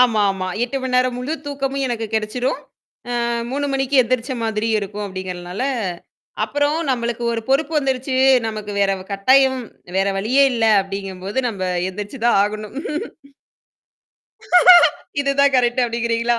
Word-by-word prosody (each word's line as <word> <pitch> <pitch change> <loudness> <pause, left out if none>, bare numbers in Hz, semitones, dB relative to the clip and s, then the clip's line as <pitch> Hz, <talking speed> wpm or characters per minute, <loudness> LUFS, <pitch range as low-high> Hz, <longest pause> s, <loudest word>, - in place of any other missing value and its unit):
ஆமாமா. 205 -6 +2 0.2
8 255 +3 -4
மணி 260 - -3
நேரம் 255 -1 +1
முழு 255 +5 -3
தூக்கமும் 275 -1 -2
எனக்கு 230 -2 -3
கிடைச்சிடும். 220 +4 -1 0.5
அ - - -2 0.4
3 285 +2 -2
மணிக்கு 270 0 +1
எந்திரிச்ச 250 +1 -2
மாதிரியும் 220 0 0
இருக்கும், 205 +1 -5
அப்படிங்கிறதுனால 185 +1 -6 0.8
அப்புறம் 290 +2 0
நம்மளுக்கு 240 -1 -2
ஒரு 230 - -2
பொறுப்பு 280 +4 +1
வந்துருச்சு, 265 -1 -1 0.3
நமக்கு 215 -1 -5
வேற 200 -1 +3
வ் 185 - -12
கட்டாயம் 260 +6 +3 0.4
வேற 195 +1 +2
வழியே 245 +8 +3
இல்ல 230 -2 0 0.2
அப்படிங்கும்போது 195 +2 -6
நம்ம, 200 -5 -5 0.3
எந்திரிச்சு 205 +6 -7
தான் 235 - +4
ஆகணும். 210 +1 -4 2.5
இது 275 0 +1
தான் 280 -1 +4
கரெக்ட் 250 0 +2
அப்படிங்கிறீங்களா? 235 0 0
235 Hz, 130 wpm, -20 LUFS, 205-265 Hz, 2.5 s, தான்